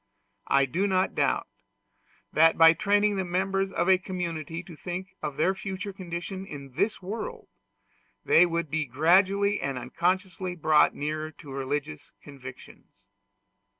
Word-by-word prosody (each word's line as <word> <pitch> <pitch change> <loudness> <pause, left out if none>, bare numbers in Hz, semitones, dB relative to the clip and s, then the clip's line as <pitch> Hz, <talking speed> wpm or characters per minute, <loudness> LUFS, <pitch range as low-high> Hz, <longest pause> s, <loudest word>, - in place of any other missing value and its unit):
I 140 0 +4
do 175 +10 0
not 185 -1 +1
doubt - - +1 0.9
that, 165 +1 +5
by 165 0 +8
training 205 +2 +2
the 190 - 0
members 190 +2 -1
of 185 - 0
a 190 -1 +5
community 170 -3 -4
to 170 -2 -12
think 180 +3 -6
of 150 -2 -4
their 185 +5 +2
future 195 -1 -5
condition 185 +1 -6
in 140 -7 -9
this 205 - -1
world, 430 - -6 0.8
they 180 +2 +6
would 170 -3 -2
be 160 -1 0
gradually 190 - +3
and 135 -2 -2
unconsciously 185 +5 -2
brought 155 -2 +4
nearer 155 +1 -3
to 145 -2 -12
religious 135 - -4
convictions. 130 -7 -13
175 Hz, 140 wpm, -27 LUFS, 150-190 Hz, 0.9 s, by